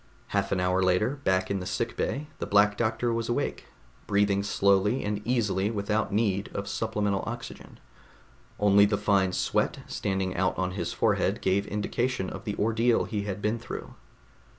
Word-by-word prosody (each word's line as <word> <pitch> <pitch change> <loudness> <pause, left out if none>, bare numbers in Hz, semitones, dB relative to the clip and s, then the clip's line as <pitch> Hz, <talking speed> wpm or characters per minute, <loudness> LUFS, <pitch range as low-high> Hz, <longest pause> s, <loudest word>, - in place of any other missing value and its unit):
Half - - 0
an 95 - +1
hour 90 +1 +2
later, 95 +9 +2
back 95 0 +1
in 100 - 0
the 90 - -5
sickbay, 125 +5 -2
the - - -3
Black 105 0 +4
Doctor 115 +2 0
was 115 0 -2
awake, 120 - -2 0.4
breathing 100 -1 +2
slowly 100 +3 +2
and 105 0 -2
easily 105 -5 +1
without 105 0 -1
need 100 -1 0
of 100 0 -3
supplemental 105 -2 -1
oxygen. - - -8 0.8
Only 100 0 +6
the 105 0 +1
fine 95 -3 +2
sweat - - 0
standing 95 -2 -2
out 95 +1 0
on 95 0 -1
his 90 -3 -3
forehead - - +1
gave 100 +2 +1
indication 105 0 -1
of - - -8
the 105 - -2
ordeal 115 +2 +2
he 105 -3 -3
had 100 0 -4
been 110 +2 0
through. 115 - -7
100 Hz, 165 wpm, -27 LUFS, 95-110 Hz, 0.8 s, Only